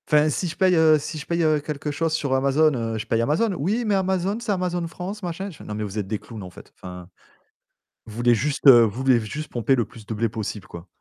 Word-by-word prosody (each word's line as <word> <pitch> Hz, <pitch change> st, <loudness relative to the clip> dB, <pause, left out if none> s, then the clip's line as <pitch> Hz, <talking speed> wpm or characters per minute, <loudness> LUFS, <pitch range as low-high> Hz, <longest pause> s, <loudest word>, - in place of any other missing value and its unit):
Enfin 150 Hz, 0 st, +4 dB
si 180 Hz, +4 st, -2 dB
je 160 Hz, -, -6 dB
paye, 190 Hz, -2 st, +4 dB
heu, 160 Hz, -1 st, +5 dB
si 155 Hz, +2 st, -6 dB
je 150 Hz, -, -7 dB
paye, 170 Hz, 0 st, 0 dB
heu, 155 Hz, -1 st, +3 dB
quelque 150 Hz, 0 st, -4 dB
chose 160 Hz, +2 st, -1 dB
sur 140 Hz, -4 st, -1 dB
Amazon, 140 Hz, +3 st, +3 dB
heu, 115 Hz, -3 st, -2 dB
je 105 Hz, -, -5 dB
paye 115 Hz, -, 0 dB
Amazon. 160 Hz, -, +1 dB
«Oui, 205 Hz, -, -1 dB
mais 210 Hz, -2 st, +2 dB
Amazon, 190 Hz, +1 st, 0 dB
c'est 235 Hz, -2 st, -3 dB
Amazon 180 Hz, -2 st, -1 dB
France», 190 Hz, +5 st, -7 dB
machin. 180 Hz, +3 st, -4 dB
Je 165 Hz, -, -12 dB
fais: -, -, -12 dB
«Non, 105 Hz, -, -6 dB
mais 105 Hz, -, -3 dB
vous 105 Hz, 0 st, -6 dB
êtes 100 Hz, -, -4 dB
des 105 Hz, 0 st, -3 dB
clowns 110 Hz, -4 st, -10 dB
en 90 Hz, -, -8 dB
fait. 85 Hz, -, -15 dB
Enfin, 90 Hz, -1 st, -10 dB, 1.0 s
vous 110 Hz, -1 st, -11 dB
voulez 120 Hz, 0 st, +3 dB
juste 140 Hz, +3 st, +3 dB
vous 120 Hz, -3 st, +8 dB
voulez 130 Hz, -3 st, +4 dB
juste 140 Hz, +8 st, -6 dB
pomper 120 Hz, +3 st, +1 dB
le 120 Hz, -3 st, 0 dB
plus 110 Hz, -2 st, -14 dB
de 110 Hz, -, -5 dB
blé 115 Hz, +1 st, 0 dB
possible 105 Hz, -2 st, -5 dB
quoi». 85 Hz, +1 st, -10 dB
145 Hz, 260 wpm, -23 LUFS, 115-170 Hz, 1.0 s, vous